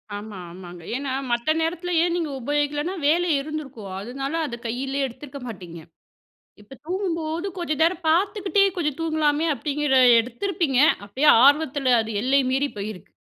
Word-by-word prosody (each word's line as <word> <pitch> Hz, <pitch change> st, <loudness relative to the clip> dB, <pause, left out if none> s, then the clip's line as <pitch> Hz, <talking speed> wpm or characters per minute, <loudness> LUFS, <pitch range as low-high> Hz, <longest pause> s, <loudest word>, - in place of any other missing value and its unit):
ஆமா, 205 Hz, -1 st, -8 dB
ஆமாங்க. 175 Hz, -1 st, -11 dB
ஏன்னா, 275 Hz, 0 st, -3 dB, 0.2 s
மத்த 240 Hz, +6 st, +1 dB
நேரத்தில் 340 Hz, +1 st, -1 dB
ஏன் 345 Hz, -1 st, +1 dB
நீங்க 325 Hz, -4 st, -2 dB
உபயோகிக்கலன்னா 295 Hz, +6 st, -1 dB
வேலை 345 Hz, +3 st, +2 dB
இருந்திருக்கும் 275 Hz, -10 st, -7 dB
அதனால 270 Hz, +7 st, -5 dB
அத 235 Hz, -, -5 dB
கையிலேயே 270 Hz, +4 st, -2 dB
எடுத்துருக்க 270 Hz, +3 st, -10 dB
மாட்டீங்க. 175 Hz, -6 st, -8 dB, 0.8 s
இப்ப 230 Hz, +6 st, -14 dB
தூங்கும்போது 340 Hz, -2 st, -2 dB
கொஞ்சம் 315 Hz, -3 st, -2 dB
நேரம் 340 Hz, +1 st, +2 dB
பார்த்துக்கிட்டே 395 Hz, +4 st, +2 dB
கொஞ்சம் 300 Hz, -3 st, -2 dB
தூங்கலாமே 315 Hz, -1 st, +1 dB
அப்படிங்கிற 295 Hz, -1 st, -1 dB, 0.3 s
எடுத்திருப்பீங்க 275 Hz, -, -2 dB, 0.3 s
அப்படியே 265 Hz, +9 st, +1 dB, 0.2 s
ஆர்வத்தில் 285 Hz, -2 st, +3 dB
அது 220 Hz, -2 st, -3 dB
எல்லை 270 Hz, +2 st, +3 dB
மீறி 280 Hz, +1 st, 0 dB
போயிருக்கு. 200 Hz, -2 st, -6 dB
290 Hz, 135 wpm, -23 LUFS, 245-325 Hz, 0.8 s, ஆர்வத்தில்